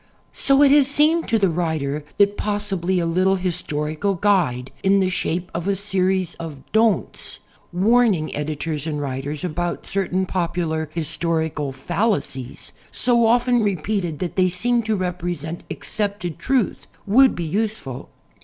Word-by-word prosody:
So 275 +1 +4
it 280 - +6
has 285 -2 +6
seemed 305 +4 +3
to 225 - +2
the 195 -4 +2
writer 155 -4 -2
that 200 0 +4
possibly 195 -4 -1
a 175 - +1
little 185 +3 +2
his 180 -1 -2
torical 155 +6 -2
guide 155 -12 +1
in 195 +1 +4
the 185 -1 +1
shape 180 0 -2
of 170 +2 -3
a 200 - +2
series 190 -2 0
of 155 -5 -7
"Don'ts," 220 0 +1 0.3
warning 200 -2 +2
editors 150 +1 -3
and 150 -2 -2
writers 140 +2 -4
about 175 0 -3
certain 190 -1 -1
popular 170 -4 -2
historical 160 -2 -1
falla 175 - 0
cies, 130 -2 -9 0.2
so 235 -2 +3
often 245 +1 +3
repeated 195 -4 -1
that 180 +2 -4
they 185 -1 +4
seem 235 +7 +1
to 220 - +3
represent 175 -3 -3
accepted 200 -5 -3
truth, 260 -5 0 0.2
would 255 +6 +5
be 170 - -3
useful. 195 - -3
180 Hz, 145 wpm, -22 LUFS, 160-205 Hz, 0.3 s, it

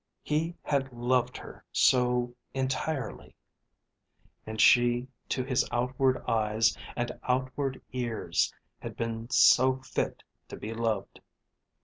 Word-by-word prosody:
He 160 +3 -1
had 135 -2 0
loved 125 +1 0
her - - -11
so 125 -1 +3 0.2
entirely; 135 0 -3 1.1
and 110 0 -5
she 120 +1 +5 0.2
to 130 - 0
his 130 -1 +1
outward 130 +2 +1
eyes 110 0 +2 0.2
and 120 0 -1
outward 130 +1 -1
ears 120 -3 0 0.3
had - - -8
been 115 0 -3
so 130 +1 +6
fit 130 - -3 0.2
to - - -8
be 110 - -5
loved! 110 -3 -2
125 Hz, 110 wpm, -29 LUFS, 115-130 Hz, 1.1 s, so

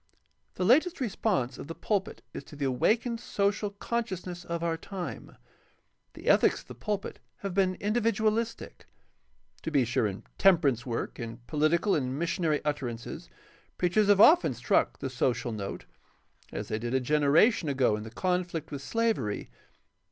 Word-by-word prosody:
— - - -45
The 180 - -1
latest 315 - +4
response 190 - -1
of - - -7
the 165 - -6
pul 205 -3 +1
pit - - -12
is - - -6
to - - -12
the 140 -1 -2
awakened 225 - +1
social 205 -1 0
consciousness 195 -4 -4
of 170 -1 -4
our 165 -1 0
time. 180 +2 -7 0.8
The - - -12
ethics - - +4
of - - -22
the - - -6
pulpit 210 -2 -4 0.2
has 195 - -3
been 185 0 +2
individualistic. 220 +1 -1 0.7
To - - -3
be 140 -5 +3
sure, 115 -2 +1
in 95 -1 -6 0.2
temperance 150 - +4
work, 115 -1 -3
in 115 -1 -5
poHtical 160 +6 +2
and 130 -2 -1
missionary 165 -2 0
utterances, 120 - -4 0.5
preachers 190 +4 +2
have 205 -1 +5
often 210 - +6
struck 120 - +1
the - - -4
social 125 -1 0
note, 100 -3 -5 0.7
as - - -5
they 110 - -1
did 120 +3 -2
a - - +4
generation 150 - +3
ago 130 -6 +2
in 105 - -5
the 110 - -7
conflict 175 +3 -2
with 140 -2 -5
slavery. 220 - -1
170 Hz, 160 wpm, -29 LUFS, 130-205 Hz, 0.8 s, often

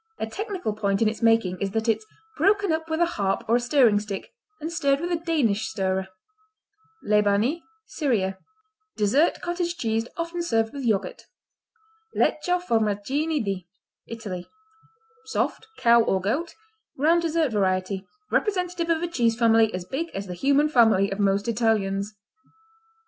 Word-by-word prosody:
A - - -2
technical 375 - -4
point 200 0 0
in - - +3
its 220 +2 -3
making 225 -6 +2
is 200 - 0
that 225 +1 -1
it's 220 -1 0 0.3
"broken 400 +3 +2
up 320 0 -2
with 320 +1 -1
a - - +6
harp 200 - -1
or 230 +2 +4
a - - 0
stirring 245 -4 +4
stick 210 - -7 0.3
and 320 +2 -5
stirred 280 -5 +1
with 345 +3 -3
a - - +2
Danish 250 -12 +1
stirrer." 190 -3 -1 1.0
Lebanie 210 +9 +2 0.2
Syria 215 - -1 0.6
Dessert 240 +11 +2
cottage 345 0 -2
cheese 225 -2 -1
often 335 +1 -3
served 225 -9 0
with 275 -2 -5
yogurt. 215 -4 -1 0.9
Lecco, 360 +4 +1
Formaggini 255 - 0
di 190 -3 -3 0.4
Italy 205 -6 -7 0.8
Soft; 440 - -2
cow 235 0 +5
or 195 -4 +1
goat; 260 - -2 0.4
round 325 +5 +3
dessert 325 -4 0
variety; 190 -1 -1 0.2
representative 360 -4 0
of 330 0 +1
a - - 0
cheese 235 -9 +1
family 225 -2 +4
as 180 -1 -5
big 300 - -3
as 195 +1 -4
the 180 - -6
human 280 +10 +2
family 225 -8 +4
of 195 - -4
most 200 +1 +1
Italians. 210 -3 0
230 Hz, 150 wpm, -25 LUFS, 205-320 Hz, 1.0 s, a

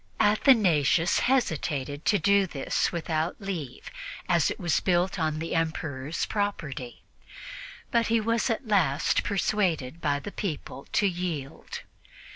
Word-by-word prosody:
Athanasius 195 - +4
hesitated 150 - 0
to 210 - +4
do 200 +2 +3
this 140 -5 -1
without 165 -1 -2
leave, 170 -10 -6 0.4
as 170 -3 +3
it - - -5
was 170 -5 +1
built 180 0 +1
on 155 -1 0
the 165 +1 -4
Emperor's 160 -3 -2
property, 160 - -3 0.9
but 235 -1 +2
he 230 0 +3
was 230 +3 0
at 230 +2 -2
last 165 -9 +2
persuaded 175 -8 0
by 145 -2 +1
the 145 +8 -7
people 155 -8 -5
to 205 - +2
yield. 175 -7 -3
170 Hz, 125 wpm, -27 LUFS, 150-205 Hz, 0.9 s, Athanasius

